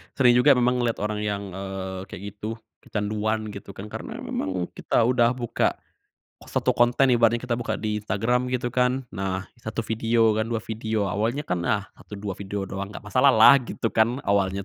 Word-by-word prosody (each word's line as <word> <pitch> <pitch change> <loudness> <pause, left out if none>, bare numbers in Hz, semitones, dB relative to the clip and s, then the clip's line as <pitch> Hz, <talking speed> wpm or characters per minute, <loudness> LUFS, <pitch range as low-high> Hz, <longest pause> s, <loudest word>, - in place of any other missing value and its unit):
Sering 125 -3 +5
juga 140 +2 +6
memang 125 0 +2
ngeliat 120 -2 0
orang 105 0 -2
yang, 105 -1 -2
eee, 95 0 -5
kayak 95 - -9
gitu, 110 +2 -5 0.2
kecanduan, 110 +1 -2
gitu 100 -1 -9
kan. 105 +2 -8
Karena, - - -6
memang 95 -2 -3
kita - - 0
udah 120 0 +3
buka 120 -2 0 0.7
satu - - +1
konten 120 +2 +3
ibaratnya, 115 -1 +4
kita 125 - -2
buka 120 0 -2
di 105 -1 -2
Instagram 120 +5 0
gitu 125 -1 -2
kan, 125 +1 +1
nah 95 -1 -3 0.2
1 110 0 -4
video 115 0 +2
kan, 110 +1 -1
2 115 - -1
video, 110 -1 -2
awalnya 110 +9 -1
kan. 90 -1 -1
Nah, 100 +3 0
"Satu, 105 - -11
dua 100 0 -4
video 100 0 -4
doang, 100 +1 -5
nggak 105 +1 -10
masalah 125 +7 +4
lah." 135 +2 +8
Gitu 115 -2 -3
kan, 115 +2 +3
awalnya. 100 -1 +1
110 Hz, 185 wpm, -25 LUFS, 100-120 Hz, 0.7 s, lah